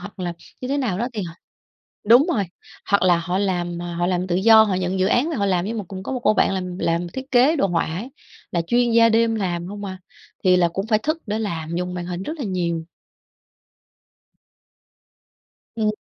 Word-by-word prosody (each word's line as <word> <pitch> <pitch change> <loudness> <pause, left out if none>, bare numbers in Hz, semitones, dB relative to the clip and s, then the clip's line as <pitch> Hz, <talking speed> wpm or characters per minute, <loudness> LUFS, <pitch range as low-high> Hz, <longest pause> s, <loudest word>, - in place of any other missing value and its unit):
hoặc 200 +2 -10
là 175 -2 -3 0.3
như 255 - -5
thế 280 +1 0
nào 220 -9 -1
đó 235 - 0
thì 215 - -3
h 175 - -5 0.8
đúng 245 +6 +7
rồi, 205 - +1 0.5
hoặc 200 -2 +4
là 180 -2 +4
họ 180 +2 -2
làm, 175 -3 -1
ờ, 175 0 -5
họ 175 +1 0
làm 180 0 0
tự 175 -1 0
do, 220 +3 +7
họ 205 -3 0
nhận 185 +1 -1
dự 185 - +2
án 250 +9 +2
về 320 - -2
họ 200 - 0
làm. 180 -2 +1
Giống 225 +1 -3
một 205 - -4
cũng 190 -1 -7
có 230 - -5
một 255 - -2
cô 215 -1 +3
bạn - - +2
làm 180 -1 -4
làm 170 +1 0
thiết 265 +8 -8
kế 265 +6 +4
đồ 200 - +2
họa 175 -3 0
ấy, 220 +10 -5 0.4
là 170 -1 +1
chuyên 240 +7 +2
gia 230 0 +6
đêm 225 0 +3
làm 175 -5 -2
hông 205 +2 -7
à, 185 -1 -6 0.5
thì 185 -1 +5
là 175 -1 +3
cũng 195 +4 -4
phải 220 -1 +3
thức 310 +8 -2
để 210 +1 -2
làm, 170 -7 -4
dùng 180 0 -3
màn 175 -1 -4
hình 180 0 -4
rất 310 +10 -5
là 275 - -3
nhiều. 170 -4 -2 2.9
Ừm, 220 -2 +1
190 Hz, 230 wpm, -22 LUFS, 175-225 Hz, 2.9 s, đúng